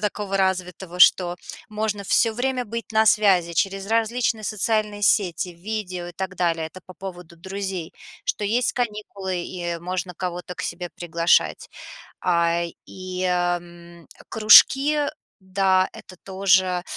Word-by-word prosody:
такого 205 Hz, -1 st, -2 dB
развитого, 185 Hz, -1 st, -2 dB
что 180 Hz, -1 st, +5 dB, 0.3 s
можно 210 Hz, -1 st, -2 dB
всё 225 Hz, +3 st, +2 dB
время 250 Hz, +2 st, -1 dB
быть 230 Hz, 0 st, -6 dB
на 220 Hz, 0 st, +4 dB
связи 195 Hz, -6 st, +3 dB
через 195 Hz, +3 st, -1 dB
различные 225 Hz, 0 st, 0 dB
социальные 210 Hz, 0 st, -1 dB
сети, 200 Hz, -3 st, +2 dB
видео 180 Hz, 0 st, -5 dB
и 175 Hz, -, -8 dB
так 190 Hz, +1 st, -5 dB
далее. 170 Hz, -2 st, 0 dB
Это 185 Hz, +4 st, -13 dB
по 185 Hz, -, -12 dB
поводу 175 Hz, -2 st, -9 dB
друзей, 190 Hz, -1 st, -5 dB, 0.3 s
что -, -, -2 dB
есть 230 Hz, +4 st, +1 dB
каникулы, 205 Hz, -5 st, -3 dB
и 175 Hz, -2 st, -4 dB
можно 180 Hz, +1 st, -4 dB
кого-то 180 Hz, 0 st, -5 dB
к -, -, -6 dB
себе 175 Hz, +1 st, -4 dB
приглашать. 170 Hz, 0 st, +1 dB, 0.5 s
А, 170 Hz, -1 st, +1 dB, 0.2 s
и, 185 Hz, 0 st, -6 dB
а, 175 Hz, -1 st, +1 dB
м, 170 Hz, -1 st, -15 dB, 0.2 s
кружки, 270 Hz, +7 st, +6 dB, 0.4 s
да, 190 Hz, 0 st, +2 dB
это 185 Hz, -, -13 dB
тоже, 185 Hz, -2 st, +2 dB
190 Hz, 135 wpm, -23 LUFS, 175-210 Hz, 0.5 s, кружки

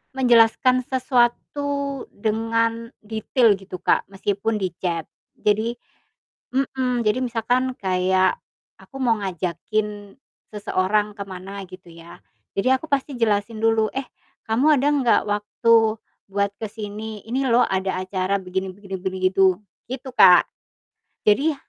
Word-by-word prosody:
menjelaskan 255 Hz, +1 st, +4 dB
sesuatu 275 Hz, +2 st, 0 dB
dengan 230 Hz, +2 st, -1 dB
detail 220 Hz, +1 st, +2 dB
gitu 195 Hz, -1 st, -9 dB
Kak -, -, +1 dB
meskipun 200 Hz, +2 st, -2 dB
di 190 Hz, -4 st, -3 dB
chat 170 Hz, -3 st, -1 dB, 0.3 s
jadi 220 Hz, +3 st, +1 dB, 0.8 s
mhm, 255 Hz, -3 st, 0 dB
jadi 215 Hz, +4 st, +2 dB
misalkan 245 Hz, +2 st, 0 dB
kayak, 185 Hz, 0 st, +1 dB, 0.4 s
aku -, -, -18 dB
mau 230 Hz, -3 st, +2 dB
ngajakin 200 Hz, +4 st, -3 dB, 0.3 s
seseorang 210 Hz, 0 st, 0 dB
ke 200 Hz, -, -4 dB
mana 195 Hz, +1 st, -8 dB
gitu 185 Hz, -1 st, -13 dB
ya. 165 Hz, +1 st, -13 dB, 0.4 s
Jadi 200 Hz, +6 st, +2 dB
aku 265 Hz, +5 st, -6 dB
pasti 280 Hz, 0 st, 0 dB
jelasin 215 Hz, -1 st, 0 dB
dulu, 225 Hz, -1 st, +3 dB
"Eh 270 Hz, -, -1 dB, 0.5 s
kamu 240 Hz, +6 st, +2 dB
ada 280 Hz, -, +1 dB
nggak 260 Hz, -5 st, +3 dB
waktu 210 Hz, +3 st, +2 dB, 0.6 s
buat 200 Hz, 0 st, 0 dB
ke 220 Hz, -, -3 dB
sini? 215 Hz, 0 st, -7 dB
Ini 260 Hz, +3 st, -1 dB
loh 240 Hz, +1 st, +5 dB
ada 190 Hz, -1 st, -1 dB
acara 185 Hz, +1 st, -1 dB
begini 190 Hz, +1 st, -3 dB
begini 195 Hz, -1 st, -7 dB
begini," 190 Hz, +1 st, -4 dB
gitu. 190 Hz, -1 st, +3 dB, 0.3 s
Gitu 260 Hz, +1 st, -6 dB
Kak. 180 Hz, -6 st, +7 dB, 0.8 s
Jadi 280 Hz, +10 st, +4 dB
215 Hz, 125 wpm, -22 LUFS, 195-245 Hz, 0.8 s, Kak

